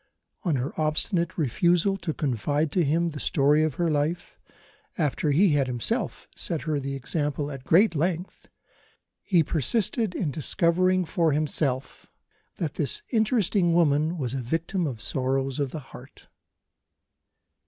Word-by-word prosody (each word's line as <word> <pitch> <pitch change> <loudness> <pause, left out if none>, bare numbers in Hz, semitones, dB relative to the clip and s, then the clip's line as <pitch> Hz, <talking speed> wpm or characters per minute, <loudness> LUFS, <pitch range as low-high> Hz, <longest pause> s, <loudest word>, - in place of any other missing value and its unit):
On 170 -7 0
her 130 +2 -2
obstinate 170 +3 +1
refusal 170 - +2
to 170 -3 -3
confide 145 +2 -1
to 180 - +2
him 165 +4 +1
the 150 -2 -7
story 145 +1 +3
of 155 -4 0
her 170 -2 0
life 150 +4 -2 0.6
after 150 -1 0
he 175 +8 +4
had 145 -3 +2
himself 120 -2 -2
set 165 - -1
her 155 -3 -1
the 140 0 -4
example 145 +2 -2
at 135 -1 -9
great 185 +6 +4
length 170 +3 -3 0.7
he 175 -5 +3
persisted 200 - 0
in 155 -6 -1
discovering 180 +5 +1
for 165 -3 +1
himself 145 -3 -1 0.5
that - - -3
"this 420 0 -1
interesting 210 -6 +2
woman 155 0 +2
was 130 -5 -3
a 135 - -2
victim 165 +7 -2
of 115 -5 -5
sorrows 135 +1 -1
of 140 -2 0
the 155 - -6
heart." - - -13
155 Hz, 145 wpm, -26 LUFS, 140-175 Hz, 0.7 s, he